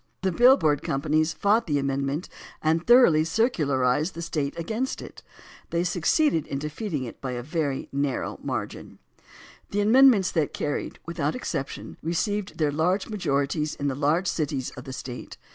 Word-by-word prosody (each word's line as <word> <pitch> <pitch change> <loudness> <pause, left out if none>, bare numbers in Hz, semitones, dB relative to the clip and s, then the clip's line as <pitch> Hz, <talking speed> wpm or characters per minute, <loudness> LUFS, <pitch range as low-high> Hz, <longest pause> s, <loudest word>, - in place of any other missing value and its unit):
The 190 - +2
bill 250 +8 +6
board 150 - +1
companies 155 +1 0
fought 210 +7 +2
the 145 -2 +1
amendment 140 +3 -1 0.3
and 160 +2 0
thoroughly 240 -11 +7
circularized 155 - +1
the 170 - -6
State 155 -2 -2
against 220 +10 -2
it. - - -10 0.5
They 170 +1 0
succeeded 180 - +1
in 140 - -3
defeating 150 - -4
it 120 - -9
by 130 -2 -3
a 120 0 -4
very 150 -1 -2
nar 140 -1 -1
row - - -6
margin. - - -5 0.7
The 205 - 0
amendments 225 -3 +5
that 155 -4 -1
carried, 145 - -3
without 160 -3 -2
exception, 140 - -5
received 205 +5 -2
their 150 -2 +1
large 180 +8 0
majorities 150 -5 -1
in 145 - -1
the - - -1
large 155 +6 +1
cities 145 -6 -2
of 125 - -10
the 130 - -7
State. 125 -1 -7
155 Hz, 160 wpm, -26 LUFS, 140-190 Hz, 0.7 s, thoroughly